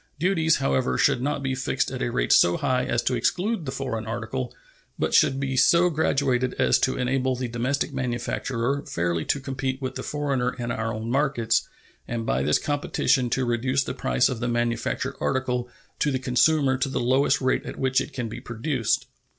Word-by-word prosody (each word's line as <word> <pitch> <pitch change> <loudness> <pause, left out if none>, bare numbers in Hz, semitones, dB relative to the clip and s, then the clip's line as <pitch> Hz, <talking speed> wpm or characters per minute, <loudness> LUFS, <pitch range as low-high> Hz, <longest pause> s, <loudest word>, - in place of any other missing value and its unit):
Duties, 160 -1 +2
however, 65 -2 0
should - - +3
not 140 +1 -1
be 135 -1 -1
fixed 130 0 -1
at - - -5
a - - 0
rate - - 0
so 85 - +5
high 125 0 0
as 120 0 0
to 130 - 0
exclude 180 - 0
the - - -2
foreign 115 -5 -4
article, 120 +2 -3 0.5
but - - -1
should 135 - +4
be 135 -1 -2
so 170 +6 +5
graduated 135 -5 +1
as - - +3
to 130 - 0
enable 130 0 0
the 125 0 -3
domestic 125 +5 -1
manufacturer 125 +1 -2
fairly 85 -1 -1
to 140 - 0
compete 135 -1 -3
with 130 -2 -4
the - - -5
foreigner 140 -4 -1
in 120 -1 -3
our 115 0 -2
own 110 +1 -4
markets, 125 -4 +1 0.4
and 115 -1 -3
by 65 - 0
this 75 +2 +3
competition 145 -3 0
to 130 +1 0
reduce 130 +3 +1
the - - -4
price 125 - +1
of 125 -3 -3
the 120 - -2
manufactured 120 +3 -1
article 125 -2 -1 0.3
to 150 - +2
the 135 - 0
consumer 130 +2 +2
to 135 - 0
the 135 - -2
lowest 130 +4 +2
rate 130 -1 +1
at - - -6
which 130 0 +2
it - - -6
can 125 -3 -4
be 115 +2 -7
produced. 120 0 -1
130 Hz, 195 wpm, -25 LUFS, 120-135 Hz, 0.5 s, so